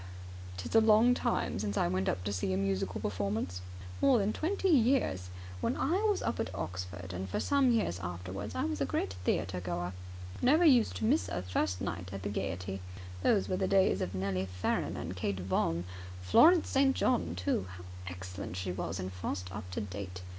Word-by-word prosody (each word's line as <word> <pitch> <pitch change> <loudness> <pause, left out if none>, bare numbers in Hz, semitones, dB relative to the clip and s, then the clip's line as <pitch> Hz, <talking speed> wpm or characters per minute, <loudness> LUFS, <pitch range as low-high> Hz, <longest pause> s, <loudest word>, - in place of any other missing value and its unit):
"It's - - -5
a 225 - +7
long 220 +3 +6
time 240 - -1
since 100 0 -2
I - - +3
went 95 +2 0 0.2
to 100 - -1
see 95 0 -1
a - - +1
musical 95 -1 -1
performance. 100 -2 -2 0.4
More 270 -3 +5
than 210 0 +1
twenty 385 +4 0
years. 240 - +3 0.3
When - - -1
I 345 +9 +1
was 410 - 0
up - - -1
at 110 - -1
Oxford, 90 +1 -5
and 95 +1 -4
for - - -1
some 280 -2 +3
years 220 - +1
afterwards, 90 +3 -5
I - - 0
was 105 -1 -2
a - - +3
great 95 +1 -1
theatre 90 0 0
goer. 90 0 -3 0.5
Never 305 +7 +5
used 250 -8 +5
to - - -2
miss 280 +8 +2
a 90 - -3
first 90 0 -1
night 90 +1 -4
at 100 -1 -6
the 100 - -2
Gaiety. 95 -1 -3 0.4
Those 200 - +3
were 185 - 0
the 190 0 0
days 190 - +3
of 90 +2 -3
Nellie 95 0 -1
Farren 90 -1 -1
and 90 +3 -5
Kate 95 +1 -2
Vaughan. 85 -2 0 0.4
Florence 320 - +6
St. 270 0 +3
John, 85 -1 +1
too. 90 +1 -1
How 90 - -10 0.2
excellent 90 0 -6
she 90 0 -2
was 90 0 -3
in 95 0 -4
Faust 90 0 -4
Up 100 -3 -6
To 90 - -3
Date! 95 -2 -6
95 Hz, 195 wpm, -32 LUFS, -, 0.5 s, a